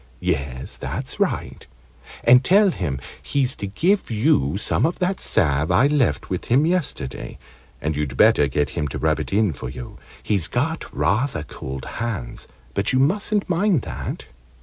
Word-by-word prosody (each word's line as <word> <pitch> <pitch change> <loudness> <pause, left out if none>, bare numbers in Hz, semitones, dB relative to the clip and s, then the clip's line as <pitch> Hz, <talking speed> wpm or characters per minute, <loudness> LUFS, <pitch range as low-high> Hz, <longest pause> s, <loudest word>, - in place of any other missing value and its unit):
"Yes, 70 -7 -2
that's - - -4
right. - - -2 0.6
And 125 +2 +7
tell 195 +6 +5
him 75 - -3 0.2
he's 135 -2 0
to 100 - -4
give 180 - +1
you 105 - +2
some - - +1
of 170 - +1
that 185 +1 -1
salve 75 -6 +2
I 90 +9 +4
left 140 - +1
with - - -3
him 135 +6 +3
yesterday. 130 - -2 0.4
And 75 +1 -2
you'd 70 -3 -3
better 75 - +5
get 70 0 -1
him 75 -3 -2
to 65 - -5
rub - - +1
it - - -5
in 100 -3 +2
for 65 -1 -6
you. 65 -1 -9 0.2
He's 100 -6 +1
got 160 +9 -2
rather 110 - 0
cold 65 -2 -7
hands, 110 - -5 0.3
but 100 - +1
you 130 - +2
mustn't 200 +9 +1
mind 180 - +2
that." - - -6
105 Hz, 165 wpm, -22 LUFS, -, 0.6 s, And